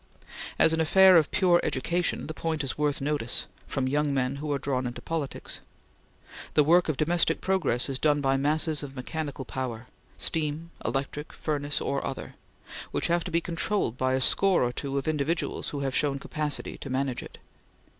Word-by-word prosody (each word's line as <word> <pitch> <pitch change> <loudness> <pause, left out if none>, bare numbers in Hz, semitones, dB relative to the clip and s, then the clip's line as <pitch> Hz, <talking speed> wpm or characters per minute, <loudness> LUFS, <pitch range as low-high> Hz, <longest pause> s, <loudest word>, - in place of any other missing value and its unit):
As 160 - +5
an 160 - +1
affair 190 +3 +7
of 160 -3 +5
pure 180 -3 +4
education 170 +6 0
the 155 - -5
point 160 -2 -2
is 135 - -2
worth 150 -2 0
notice 140 -4 0 0.2
from 135 -2 -1
young 145 +2 +1
men 130 +1 0
who 150 +1 -4
are 140 - +1
drawn 130 -2 -1
into 120 - -6
politics. 160 -4 -4 1.0
The 150 - +6
work 170 +3 +4
of 150 - 0
domestic 165 +1 +2
progress 185 -10 +1
is 135 -2 -2
done 150 -1 +3
by 135 -1 +2
masses 150 +2 +1
of 140 -2 -8
mechanical 140 +1 -4
power 125 -2 -4 0.3
steam, 160 +1 -1
electric, 140 +2 -3
furnace, 145 -2 -2
or 140 - -2
other 135 - -5 0.6
which - - -2
have 170 0 +2
to - - -3
be 170 0 +1
controlled 170 - -1
by 130 0 0
a 130 - 0
score 190 +4 +3
or 120 0 0
two 140 +1 -3
of 140 - -2
individuals 155 +2 -1
who 145 - -4
have 135 -1 -1
shown 140 -2 +1
capacity 150 +1 -2
to 140 - -7
manage 130 -1 -1
it. - - -11
145 Hz, 185 wpm, -27 LUFS, 135-160 Hz, 1.0 s, affair